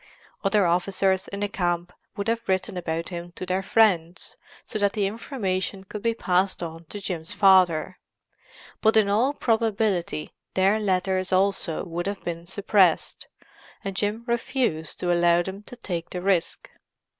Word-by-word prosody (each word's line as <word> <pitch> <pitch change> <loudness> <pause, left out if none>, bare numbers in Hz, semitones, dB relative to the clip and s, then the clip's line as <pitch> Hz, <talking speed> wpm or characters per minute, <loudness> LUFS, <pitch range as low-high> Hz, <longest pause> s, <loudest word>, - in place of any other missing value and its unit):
Other 195 0 +3
officers 190 +2 +1
in 200 0 -6
the 205 - +1
camp 175 -2 -2 0.2
would 200 - -3
have 230 0 -1
written 190 0 0
about 165 -1 -3
him 175 -1 -7
to 185 - -6
their 185 +1 0
friends, 185 -5 +2 0.3
so 215 - -4
that 200 -1 +2
the 210 -3 0
information 195 -3 -3
could 205 +2 -7
be 230 +1 0
passed 185 -3 +1
on 165 0 -7
to 205 +6 -6
Jim's 175 -5 -4
father; 185 -3 +4 0.8
but 220 0 +4
in 210 -2 +4
all 235 +7 +3
probability 220 - 0 0.2
their 195 +3 +3
letters 185 -2 0
also 190 -3 +1
would 175 +1 -4
have 200 0 -4
been 170 0 -5
suppressed, 190 -2 +2 0.6
and 195 -1 -4
Jim 210 +4 0
refused 235 - -1
to 175 -1 +2
allow 175 0 +4
them 190 +2 -7
to - - -9
take 175 -8 -5
the 180 - -4
risk. 190 -4 0
190 Hz, 155 wpm, -25 LUFS, 175-205 Hz, 0.8 s, father